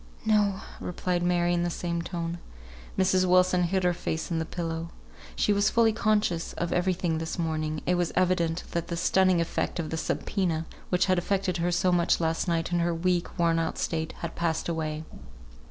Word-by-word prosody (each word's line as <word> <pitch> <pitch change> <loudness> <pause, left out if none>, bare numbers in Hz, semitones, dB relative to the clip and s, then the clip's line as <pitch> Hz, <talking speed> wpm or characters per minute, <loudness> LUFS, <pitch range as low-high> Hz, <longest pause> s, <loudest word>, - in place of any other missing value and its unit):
"No!" 205 -3 +2 0.2
replied 180 0 -2
Mary, 175 0 +2
in 175 - +1
the 175 - 0
same 170 0 -2
tone. 170 -1 -4 0.6
Mrs. 185 0 +3
Wilson 180 0 +4
hid 185 +2 0
her 180 0 +3
face 160 0 -3
in 165 - 0
the 160 - -1
pillow. 165 -1 -4 0.5
She 210 - +2
was 200 +1 +3
fully 230 -1 +3
conscious 210 -6 +1
of 170 - -2
every 180 +1 +2
thing 170 -3 -1
this 160 0 -4
morning; 155 -2 -2
it 180 - +2
was 175 -1 0
evident 180 -2 +1
that 170 -1 -2
the 170 - -3
stunning 185 0 +3
effect 170 - -1
of 160 -2 -3
the 160 - -2
subpoena, 165 -1 -1 0.2
which 180 -1 +3
had 185 -2 +2
affected 185 0 0
her 175 +1 0
so 180 +1 +2
much 175 -1 +3
last 165 +1 0
night 165 0 0
in 175 - +2
her 170 0 +1
weak, 175 +1 0
worn 165 -1 +3
out 165 - -2
state, 160 -1 -2
had 170 -1 -4
passed 165 -1 -1
away. 155 -2 -2
175 Hz, 195 wpm, -27 LUFS, 165-185 Hz, 0.6 s, Wilson